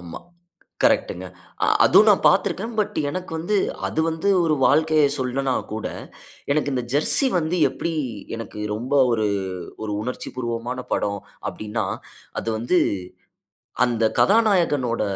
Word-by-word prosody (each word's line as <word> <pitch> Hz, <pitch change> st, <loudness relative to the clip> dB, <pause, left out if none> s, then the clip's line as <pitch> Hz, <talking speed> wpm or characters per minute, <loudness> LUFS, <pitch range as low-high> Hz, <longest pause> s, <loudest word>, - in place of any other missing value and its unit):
ஆமா. 85 Hz, -1 st, -8 dB, 0.6 s
கரெக்ட்டுங்க. 90 Hz, +1 st, +1 dB, 0.4 s
அ -, -, +2 dB, 0.2 s
அதுவும் -, -, +6 dB
நான் -, -, +3 dB
பாத்துருக்கேன். 225 Hz, +5 st, 0 dB
பட் 210 Hz, -, 0 dB
எனக்கு 185 Hz, +4 st, -5 dB
வந்து, 190 Hz, +6 st, 0 dB, 0.3 s
அது -, -, -1 dB
வந்து 165 Hz, +4 st, -1 dB, 0.2 s
ஒரு 160 Hz, -2 st, +2 dB
வாழ்க்கைய 155 Hz, +2 st, +4 dB
சொல்லனா 130 Hz, +1 st, -1 dB, 0.2 s
கூட, 110 Hz, 0 st, -4 dB, 0.7 s
எனக்கு 145 Hz, -1 st, 0 dB
இந்த 125 Hz, -2 st, -1 dB
ஜெர்சி 150 Hz, -, +3 dB
வந்து 170 Hz, +2 st, -1 dB
எப்பிடி 165 Hz, +5 st, -4 dB, 0.4 s
எனக்கு 115 Hz, -2 st, -8 dB, 0.2 s
ரொம்ப 125 Hz, +6 st, -3 dB, 0.2 s
ஒரு, 110 Hz, -2 st, +1 dB, 0.6 s
ஒரு 105 Hz, -1 st, -3 dB
உணர்ச்சிபூர்வமான 125 Hz, 0 st, -4 dB
படம் 100 Hz, 0 st, 0 dB, 0.3 s
அப்பிடின்னா, 110 Hz, +1 st, -4 dB, 0.6 s
அது -, -, -6 dB
வந்து, 120 Hz, +11 st, +2 dB, 1.1 s
அந்த 115 Hz, -2 st, 0 dB, 0.2 s
கதாநாயகனோட 175 Hz, -, +3 dB
135 Hz, 125 wpm, -23 LUFS, 115-165 Hz, 1.1 s, அதுவும்